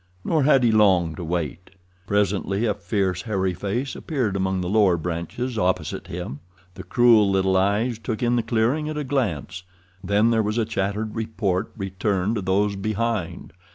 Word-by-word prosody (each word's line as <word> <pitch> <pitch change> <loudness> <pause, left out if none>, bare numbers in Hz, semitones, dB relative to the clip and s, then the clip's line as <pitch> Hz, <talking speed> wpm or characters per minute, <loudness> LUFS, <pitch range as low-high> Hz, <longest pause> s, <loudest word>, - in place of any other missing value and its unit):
Nor 155 -5 +2
had 135 -3 +5
he 120 - +4
long 95 -6 +4
to 85 - -7
wait. 85 +1 -3 0.4
Presently 100 +1 0
a 105 - +2
fierce, 95 -1 -1
hairy 95 -4 -1
face 105 +9 -3
appeared 125 - -2
among 95 -1 0
the 90 - -3
lower 100 -3 +3
branches 90 +9 -4
opposite 90 -4 -1
him. 70 - -6 0.3
The - - -9
cruel 115 -4 +4
little 95 -1 +2
eyes 105 +5 +1
took 115 0 -4
in 120 0 +2
the 120 - +2
clearing 120 +7 0
at 155 - -4
a 150 - -2
glance, 100 - -2 0.4
then 105 +4 +3
there 115 -1 +3
was 105 +1 -1
a 115 - +1
chattered 105 0 -2
report 105 -3 -2
returned 95 +1 -1
to - - -2
those 100 +2 +1
behind. 110 -2 -3
100 Hz, 170 wpm, -23 LUFS, 95-115 Hz, 0.4 s, had